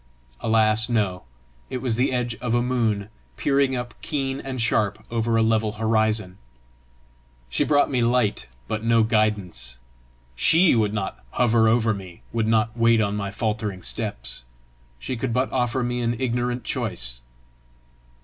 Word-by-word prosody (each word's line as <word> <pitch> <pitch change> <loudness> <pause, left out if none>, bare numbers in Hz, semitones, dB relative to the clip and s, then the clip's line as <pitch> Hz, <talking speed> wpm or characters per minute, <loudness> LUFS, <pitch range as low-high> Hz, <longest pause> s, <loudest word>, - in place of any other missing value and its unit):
Alas, 110 0 +3
no! 100 -6 0 0.5
it 130 - -3
was 125 -2 -1
the 125 +3 +1
edge 125 -2 -1
of 120 -2 0
a 120 - +3
moon 115 -5 0 0.3
peering 140 -1 +2
up 125 -1 -4
keen 135 -2 -2
and 130 -1 -5
sharp 110 -2 0
over 115 0 +1
a 115 - +4
level 110 -1 +1
horizon! 110 -3 0 1.1
She - - +1
brought 145 -1 +3
me 125 -2 +1
light 120 -2 +1 0.2
but 110 0 -3
no 115 -1 +4
guidance! 105 - 0 0.6
SHE 165 - +5
would 110 -3 +2
not 95 -10 -4
hover 115 -2 +3
over 110 0 +3
me, 95 -3 -10
would 115 -1 0
not 110 0 +2
wait 115 -1 +4
on 105 -1 0
my 100 -1 -3
faltering 105 -3 -3
steps! - - -3 0.5
She 125 - -4
could 115 0 -2
but 130 +2 0
offer 125 0 0
me 120 0 -2
an 120 0 -1
ignorant 125 -1 -1
choice! - - -3
115 Hz, 150 wpm, -24 LUFS, 105-125 Hz, 1.1 s, SHE